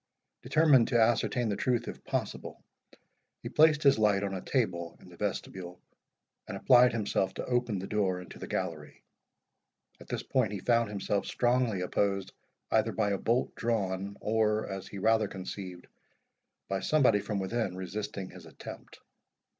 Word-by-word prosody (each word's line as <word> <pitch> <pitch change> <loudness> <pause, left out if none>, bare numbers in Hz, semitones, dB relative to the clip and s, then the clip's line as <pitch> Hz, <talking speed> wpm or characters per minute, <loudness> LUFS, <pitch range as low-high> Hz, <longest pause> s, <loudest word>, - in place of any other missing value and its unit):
Determined 145 -7 +4
to 120 - +2
ascertain 120 +1 +2
the 100 - 0
truth 120 +3 0
if - - -7
possible, - - -4 0.8
he - - -4
placed 155 -1 +4
his 140 -5 +5
light 105 -2 +3
on 100 -1 -2
a 95 - -4
table 85 -10 -1
in - - -15
the 90 - -14
vestibule, 90 -2 -4 0.7
and - - -5
applied 125 0 +6
himself 100 -4 -1
to - - -4
open 120 -4 0
the 95 - -4
door 100 -3 0
into 90 - -11
the - - -6
gallery. - - -4 1.0
At - - -13
this - - -3
point 120 -6 0
he 100 - -3
found 115 +2 +2
himself 100 0 -2
strongly 120 -5 +1
opposed 100 +1 -1 0.4
either - - +3
by 100 - 0
a 100 - -1
bolt 120 +3 0
drawn, 100 -4 -2
or, 110 0 +1
as 95 -1 -6
he 100 - -8
rather 110 +1 +3
conceived, 95 -1 -7 0.8
by 95 0 -1
somebody 125 -1 +3
from 105 0 -3
within 95 0 -2
resisting 100 +1 -5
his - - -12
attempt. - - -11
105 Hz, 160 wpm, -30 LUFS, 95-120 Hz, 1.0 s, applied